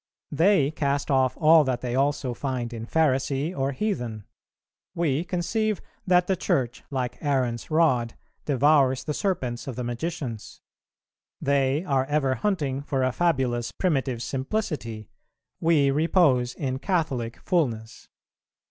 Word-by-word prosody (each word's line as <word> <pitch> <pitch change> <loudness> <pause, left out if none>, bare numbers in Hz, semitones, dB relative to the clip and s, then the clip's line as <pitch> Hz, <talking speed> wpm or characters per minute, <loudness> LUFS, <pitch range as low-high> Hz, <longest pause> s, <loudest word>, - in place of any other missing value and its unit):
They 160 -2 +3
cast 140 -2 -1
off 130 -1 +2
all 160 -1 +6
that 130 -3 -2
they 125 -1 -3
also 135 -1 0
find 125 -2 -3
in 115 0 -6
Pharisee 140 +2 +1
or 135 +1 0
heathen; 125 - -3 0.7
we 160 -3 0
conceive 200 +4 -1 0.3
that 180 -1 +4
the 190 - +1
Church, 125 -7 -1
like 125 -3 -3
Aaron's 130 -5 -1
rod, 140 -8 +2 0.3
devours 140 -1 +3
the 150 - -3
serpents 140 - -2
of 130 - -4
the 125 - -4
magicians. 120 -2 -5 0.8
They 140 +2 +1
are 135 -5 +1
ever 140 -2 +1
hunting 145 -7 -1
for 135 -2 -1
a 130 - +2
fabulous 130 -8 0
primitive 135 -9 -1
simplicity; 130 - -3 0.5
we 155 -4 +3
repose 145 -5 +2
in 130 -3 -3
Catholic 140 - -1
fulness. 120 - -2
135 Hz, 130 wpm, -25 LUFS, 125-160 Hz, 0.8 s, all